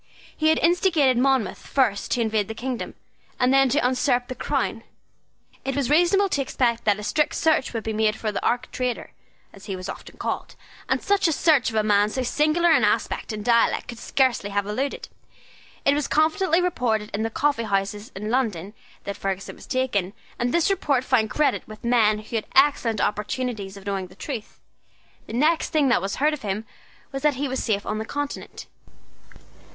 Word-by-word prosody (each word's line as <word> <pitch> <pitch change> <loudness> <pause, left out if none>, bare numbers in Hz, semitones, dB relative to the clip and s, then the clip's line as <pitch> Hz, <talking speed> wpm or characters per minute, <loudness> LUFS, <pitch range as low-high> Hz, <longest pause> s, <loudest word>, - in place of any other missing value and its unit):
He 310 - +1
had 315 0 +4
instigated 330 -7 +3
Monmouth 265 -5 +1
first 230 -8 +1
to 245 - +1
invade 220 -2 0
the 220 - -6
kingdom, 250 +1 -4 0.4
and 250 +1 +3
then 270 -1 +5
to 270 0 +2
usurp 250 -1 +1
the - - -3
crown. - - -2 0.8
It 270 - -2
was 280 -1 0
reasonable 355 +5 +4
to 285 - 0
expect 240 -3 0
that 205 -2 +3
a 210 - -7
strict 300 +7 0
search 315 -4 +2
would 225 -2 -4
be 220 - -3
made 215 0 +1
for 220 -1 -3
the - - -3
archtraitor, 245 0 -2 0.4
as 195 - -14
he 195 - -4
was 185 0 -7
often - - -9
called; - - -4 0.3
and - - 0
such 400 -2 +2
a - - +2
search 300 -5 +3
a 220 -1 0
man 205 -1 +4
of 210 - -5
so 260 - -1
singular 305 +6 +2
an - - +4
aspect - - 0
and 210 -1 -5
dialect 235 -1 +2
could 235 -2 -7
scarcely 255 -6 +1
have 200 0 -1
eluded. 255 +7 -3 0.8
It 280 - +5
was 295 -1 -1
confidently 330 +3 +2
reported 225 -11 0
in 205 - -1
the 225 - 0
coffee 285 +2 0
houses 200 +1 -2
of 195 - -6
London 210 -5 -1 0.3
that 200 - -5
Ferguson 195 0 -4
was - - -14
taken, 210 -8 -1 0.3
and 240 0 0
this 340 +5 +2
report 285 -9 +1
found 235 -5 +2
credit 300 +5 0
with 215 0 -11
men 230 -3 +3
who 215 +2 -4
had 215 - -4
excellent 265 -6 +3
opportunities 210 -2 -2
of 195 - -13
knowing 195 -2 -2
the 185 - -17
truth. 235 -1 -7 0.7
The - - -8
next 310 +7 +2
thing 300 -4 +2
that 235 - +3
was 195 +1 -3
heard 300 +2 +2
of 300 - -5
him 210 0 -3 0.5
was 270 - -4
that 300 -1 +2
he 280 +2 -2
was 260 0 -2
safe 205 -3 -1
on 215 - -2
the 220 - -4
Continent. 290 +4 -5
245 Hz, 195 wpm, -24 LUFS, 215-285 Hz, 0.8 s, then